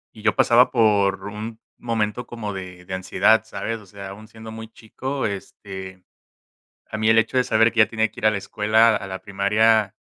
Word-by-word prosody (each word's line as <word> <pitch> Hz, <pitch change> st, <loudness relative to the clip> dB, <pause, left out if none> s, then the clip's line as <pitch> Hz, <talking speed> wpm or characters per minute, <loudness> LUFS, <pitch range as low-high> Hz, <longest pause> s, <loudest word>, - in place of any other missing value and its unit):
y 110 Hz, -, -12 dB
yo 105 Hz, -1 st, +2 dB
pasaba 120 Hz, +2 st, +4 dB
por 105 Hz, -5 st, +2 dB
un 110 Hz, +2 st, -7 dB, 0.2 s
momento 115 Hz, 0 st, -2 dB
como 110 Hz, -4 st, -6 dB
de 90 Hz, -1 st, -9 dB
de 95 Hz, -, -7 dB
ansiedad, 100 Hz, +4 st, +2 dB
¿sabes? 110 Hz, +1 st, -5 dB
O -, -, -16 dB
sea, 100 Hz, 0 st, -9 dB
aún 110 Hz, +2 st, -12 dB
siendo 110 Hz, 0 st, -11 dB
muy 110 Hz, 0 st, -9 dB
chico, 130 Hz, +5 st, -5 dB
este, 95 Hz, -2 st, -7 dB, 0.8 s
a 110 Hz, -, -6 dB
mí 110 Hz, 0 st, +2 dB
el 110 Hz, -, +5 dB
hecho 115 Hz, +3 st, +2 dB
de 125 Hz, -, +4 dB
saber 115 Hz, -1 st, +3 dB
que 115 Hz, -, -3 dB
ya 110 Hz, -, +7 dB
tenía 110 Hz, -1 st, -1 dB
que -, -, -11 dB
ir 110 Hz, -, +3 dB
a -, -, +6 dB
la 105 Hz, -, -1 dB
escuela, 110 Hz, +3 st, +2 dB
a 95 Hz, -, -5 dB
la 95 Hz, 0 st, -7 dB
primaria, 105 Hz, +1 st, +2 dB
110 Hz, 210 wpm, -22 LUFS, 100-110 Hz, 0.8 s, ya